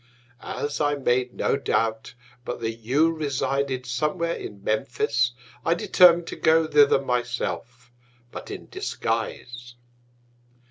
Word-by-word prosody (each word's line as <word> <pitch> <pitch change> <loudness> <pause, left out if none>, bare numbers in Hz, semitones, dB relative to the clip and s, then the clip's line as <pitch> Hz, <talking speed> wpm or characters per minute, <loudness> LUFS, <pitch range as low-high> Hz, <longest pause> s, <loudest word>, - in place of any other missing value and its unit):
As 145 +1 -4
I 145 0 +2
made 125 -2 0
no - - +1
Doubt 110 -5 -1 0.3
but 120 - -5
that 115 -1 -1
you 135 +9 +2
resided 140 -3 -2
somewhere 150 +7 -1
in 100 -1 -8
Memphis, 120 +2 0 0.3
I 165 - +2
determin'd 175 0 +5
to - - -5
go 160 0 +4
thither 145 -3 +5
my 125 -2 0
self, 120 0 -5 0.4
but - - -8
in - - -8
Disguise. 120 +2 -4
125 Hz, 125 wpm, -25 LUFS, 120-150 Hz, 0.4 s, determin'd